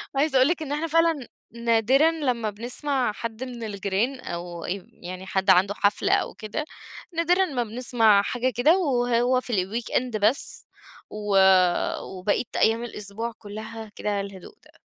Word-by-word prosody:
عايزة 275 -1 +2
أقول 255 - +6
لِك 335 0 0
إن 290 -2 -5
إحنا 305 +3 -1
فعلًا 325 -5 +2 0.2
نادرًا 235 +6 +3
لمّا 250 -9 -1
بنسمع 245 +4 -2
حد 230 +3 -6
من 245 -3 -7
الجيران 205 +5 -2
أو 170 -3 -6
ي 190 +1 -4 0.2
يعني 185 +1 -7
حد 190 0 -1
عنده 190 +2 +5
حفلة 200 0 +2
أو - - +1
كده، 220 +8 -5 0.5
نادرًا 355 +3 +3
ما 260 -8 -2
بنسمع 225 -3 +3
حاجة 245 +4 -1
كده، 310 +9 +4
وهو 245 -5 +2
في 245 - -6
الweekend 235 +2 -2
بس، 220 +7 0 0.4
و 210 -2 -1 0.6
وبقية 190 +5 -1
أيام 225 +1 +2
الأسبوع 225 0 -5
كلها 220 +1 -8
كده 205 -1 -1
الهدوء 195 - -10
ده. - - -22
235 Hz, 150 wpm, -25 LUFS, 205-265 Hz, 0.6 s, أقول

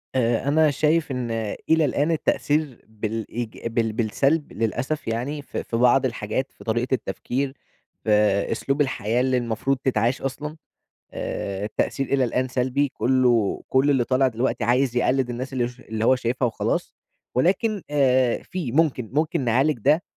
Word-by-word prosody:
آآ، 120 0 +1
أنا 155 +1 +4
شايف 155 +2 +1
إن 125 -3 -3 0.4
إلى 160 -1 +4
الآن 145 +3 +1
التأثير 150 -4 0
بالإيج 110 +2 -4
بال 115 -1 0
بالسلب 135 +7 0
للأسف 120 +7 -2
يعني، 125 +6 -2
في - - -5
في 115 - -3
بعض 125 +3 +4
الحاجات 115 +2 -2
في - - -15
طريقة 120 +3 -1
التفكير، 130 +1 -2 0.5
في 110 - 0 0.4
أسلوب 135 +5 0
الحياة 120 -4 0
اللي 130 0 +2
المفروض 120 +3 -1
تتعاش 125 -1 0
أصلًا، 150 +3 -4 0.6
آآ، 100 0 -4
التأثير 135 +5 -1
إلى 135 0 +2
الآن 125 +2 0
سلبي 130 +3 0
كلّه 125 -5 +2
كُلّ 135 +2 +3
اللي 130 -4 +3
طالع 130 +2 +3
دلوقتي 125 +2 -1
عايز 125 0 +2
يقلد 125 0 +2
الناس 130 +3 -5
اللي 125 -2 0
ش 125 +1 -14
اللي 110 -2 -4
هو 130 +2 +5
شايفها 125 +1 0
وخلاص، 115 - -2 0.4
ولكن 195 - +1
آآ، 130 -4 +3
في 170 -10 -4
ممكن 140 -6 +1
ممكن 155 +3 +1
نعالج 130 +3 +2
ده، 150 +9 +3
130 Hz, 155 wpm, -24 LUFS, 115-140 Hz, 0.6 s, هو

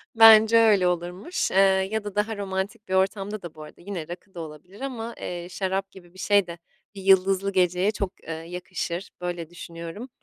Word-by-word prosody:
Bence, 225 0 +8
öyle, 210 -5 +5
olurmuş, 180 - -2
eee, - - 0 0.3
ya 220 -1 -1
da 205 -2 -7
daha 210 +1 0
romantik 200 +2 -4
bir - - -2
ortamda 195 +2 0
da 170 -2 -8
bu 155 - -9
arada 150 - -14
yine 175 -4 -6
rakı 180 +2 -10
da 175 - -8
olabilir 160 - -11
ama, 235 -4 -5
eee, 175 -1 -5
şarap 190 +1 -2
gibi 175 -2 -16
bir 185 - -15
şey 200 0 +3
de 170 0 -7 0.4
bir 195 - -8
yıldızlı 195 +1 +4
geceye 180 +1 +2
çok, 200 -3 -3 0.2
ııı, 160 0 -5
yakışır. 180 +1 -5
Böyle 175 -2 -4
düşünüyorum. 170 +6 -8
190 Hz, 190 wpm, -25 LUFS, 175-205 Hz, 0.4 s, Bence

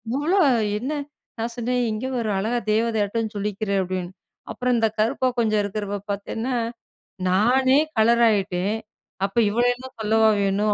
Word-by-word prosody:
இவ்ளோ 335 +8 +2 0.4
என்ன 270 +6 -3 0.5
நான் 230 +1 -3
சொன்னேன் 245 +1 -1
"இங்க 215 +4 -3
பாரு 230 -3 -1
அழகா 230 +4 0
தேவதையாட்டம் 220 0 0
ஜொலிக்கிற" 205 0 -3
அப்டின்னு. 185 -1 -4 0.4
அப்பறம் 250 -1 0
இந்த 225 -1 +2
கருப்பா 255 +3 +2
கொஞ்சம் 215 -2 +2
இருக்குறவ 205 0 -3
பாத்தேன்னா 225 +5 -3 0.7
நானே 255 +8 +4 0.2
கலரு 235 +2 +4
ஆயிட்டேன், 195 0 0 0.5
அப்ப 200 +4 -7
இவள 235 +4 +1
என்ன 260 +1 -10
சொல்லவா 220 +1 +4
வேணும் 205 +2 +1
220 Hz, 135 wpm, -23 LUFS, 205-240 Hz, 0.7 s, நானே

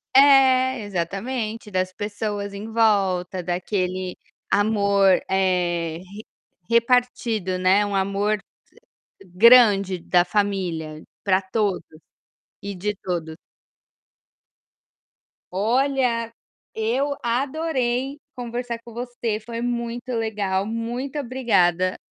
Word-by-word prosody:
É, 260 -2 +6
exatamente, 210 +4 -4
das 185 -1 -1
pessoas 205 0 -4
em 210 +3 -7
volta, 195 -5 +1
daquele 185 +1 -2 0.3
amor, 200 -2 +3
eh, 175 -4 0
re 200 +4 -12 0.4
repartido, 235 -5 +1
né, 185 +3 +3
um 205 -1 -3
amor 200 +2 0 0.9
grande 200 -1 +5
da 175 +1 +2
família 175 -5 -2 0.2
pra 190 -1 +3
todos, 195 0 -1 0.8
e 200 0 -5
de 205 +3 -2
todos. 165 -4 -4 2.2
Olha, 235 +3 +1 0.4
eu 255 +6 0
adorei 265 +1 -1 0.2
conversar 240 -1 -4
com 235 - -12
você, 240 -2 -3
foi 230 +1 -6
muito 240 0 -3
legal, 205 -4 -1
muito 235 +6 -4
obrigada. 195 -9 +1
210 Hz, 90 wpm, -23 LUFS, 185-240 Hz, 2.2 s, É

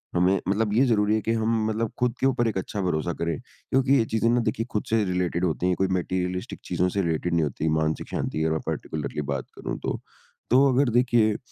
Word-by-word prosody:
हमें 90 +2 +3
मतलब 105 +2 +1
ये 125 +5 +4
ज़रूरी 105 -3 +2
है 110 - 0
कि 115 - -1
हम 110 0 +1
मतलब 110 +1 -1
खुद 125 -1 +2
के - - +1
ऊपर 120 -3 +1
एक 105 -4 -1
अच्छा 100 +2 -3
भरोसा 85 -2 -1
करें। 85 -2 -2
क्योंकि 135 +1 -1
ये 115 - +2
चीज़ें 115 +1 +2
ना 120 +1 +3
देखिए 115 0 -1
खुद 105 - -1
से 110 -1 +3
रिलेटेड 90 -1 0
होती 85 +1 -1
हैं, 90 - +2
कोई 95 - +1
मटीरियलिस्टिक 90 0 -2
चीज़ों 90 - +1
से 100 +2 0
रिलेटेड 85 0 -1
नहीं 85 -1 +3
होती 75 +2 -2
मानसिक 80 0 -1
शांति 80 - -2
अगर 80 0 +1
पार्टिकुलरली 75 -1 -3
बात 65 -2 -3
करूँ - - -4
तो। - - -2 0.5
तो 130 +4 +6
अगर 135 +1 +3
देखिए, 115 -4 +3
100 Hz, 220 wpm, -25 LUFS, 85-115 Hz, 0.5 s, तो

